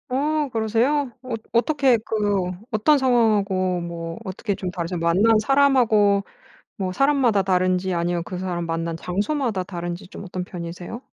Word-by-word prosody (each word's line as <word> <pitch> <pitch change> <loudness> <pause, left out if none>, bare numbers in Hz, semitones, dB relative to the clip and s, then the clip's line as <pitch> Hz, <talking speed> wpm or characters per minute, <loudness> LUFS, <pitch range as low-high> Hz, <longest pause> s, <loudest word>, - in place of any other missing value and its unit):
어. 295 +3 0
그러세요? 235 +5 +1
어 255 -2 -5 0.2
어떻게 265 +1 +3
그 205 -4 0 0.2
어떤 225 +7 +4
상황하고 205 -8 +2
뭐 170 -1 -6
어떻게 200 +2 -3
좀 185 -1 -4
다르세요? 175 -1 -4
만난 190 +7 +4
사람하고 225 -6 +3 0.5
뭐 185 -2 -2
사람마다 265 -4 +3
다른지 185 0 +1
아니면 170 0 -1
그 180 +1 -6
사람 175 -2 -3
만난 165 0 -2
장소마다 205 - -1
다른지 175 0 -6
좀 200 - -9
어떤 185 -1 -5
편이세요? 180 +6 -7
200 Hz, 330 characters per minute, -23 LUFS, 180-240 Hz, 0.5 s, 어떤